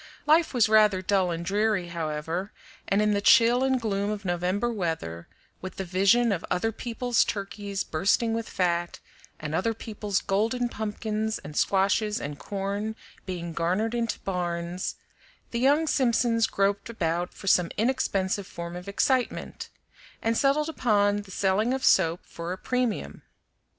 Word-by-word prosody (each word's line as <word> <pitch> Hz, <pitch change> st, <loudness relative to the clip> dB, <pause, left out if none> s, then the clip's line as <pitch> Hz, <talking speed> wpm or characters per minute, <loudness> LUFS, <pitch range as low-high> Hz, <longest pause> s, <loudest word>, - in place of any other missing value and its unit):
Life 315 Hz, +2 st, +4 dB
was 240 Hz, -4 st, +3 dB
rather 210 Hz, -3 st, +4 dB
dull 190 Hz, -1 st, +2 dB
and 170 Hz, 0 st, -3 dB
dreary, 205 Hz, -1 st, +1 dB
however, 165 Hz, +3 st, -3 dB, 0.4 s
and 200 Hz, +2 st, +2 dB
in 210 Hz, 0 st, +2 dB
the 200 Hz, -, 0 dB
chill 240 Hz, +2 st, +5 dB
and 265 Hz, -1 st, +2 dB
gloom 205 Hz, -3 st, -1 dB
of 210 Hz, -1 st, -4 dB
November 185 Hz, +6 st, 0 dB
weather, 160 Hz, -, -3 dB, 0.3 s
with 185 Hz, -, -7 dB
the 195 Hz, -, -3 dB
vision 200 Hz, +6 st, +3 dB
of 185 Hz, -3 st, -1 dB
other 225 Hz, +5 st, 0 dB
people's 240 Hz, +1 st, 0 dB
turkeys 200 Hz, -1 st, -4 dB
bursting 200 Hz, +7 st, +1 dB
with 230 Hz, 0 st, -3 dB
fat, 175 Hz, -2 st, -1 dB, 0.4 s
and 150 Hz, 0 st, -5 dB
other 225 Hz, +7 st, 0 dB
people's 210 Hz, -3 st, -2 dB
golden 225 Hz, +5 st, 0 dB
pumpkins 220 Hz, 0 st, -3 dB
and 150 Hz, +1 st, -10 dB
squashes 200 Hz, +4 st, +2 dB
and 145 Hz, 0 st, -6 dB
corn 200 Hz, +2 st, -3 dB, 0.3 s
being 170 Hz, -2 st, -4 dB
garnered 185 Hz, +8 st, 0 dB
into 235 Hz, -1 st, -1 dB
barns, 175 Hz, -1 st, -3 dB, 0.6 s
the 235 Hz, -, -1 dB
young 285 Hz, +5 st, +4 dB
Simpsons 235 Hz, -5 st, +2 dB
groped 200 Hz, +2 st, 0 dB
about 175 Hz, -5 st, -1 dB
for -, -, -12 dB
some 180 Hz, -3 st, +4 dB
inexpensive 205 Hz, -5 st, 0 dB
form 170 Hz, 0 st, -7 dB
of 180 Hz, +2 st, -8 dB
excitement, 250 Hz, +5 st, -1 dB, 0.5 s
and 225 Hz, 0 st, 0 dB
settled 285 Hz, +4 st, +2 dB
upon 205 Hz, -9 st, +2 dB
the 200 Hz, -, -15 dB
selling 200 Hz, +6 st, +1 dB
of 265 Hz, -, -2 dB
soap 170 Hz, -2 st, +4 dB
for 170 Hz, +1 st, -7 dB
a 185 Hz, -, -3 dB
premium. 240 Hz, -, -2 dB
200 Hz, 150 wpm, -27 LUFS, 180-230 Hz, 0.6 s, chill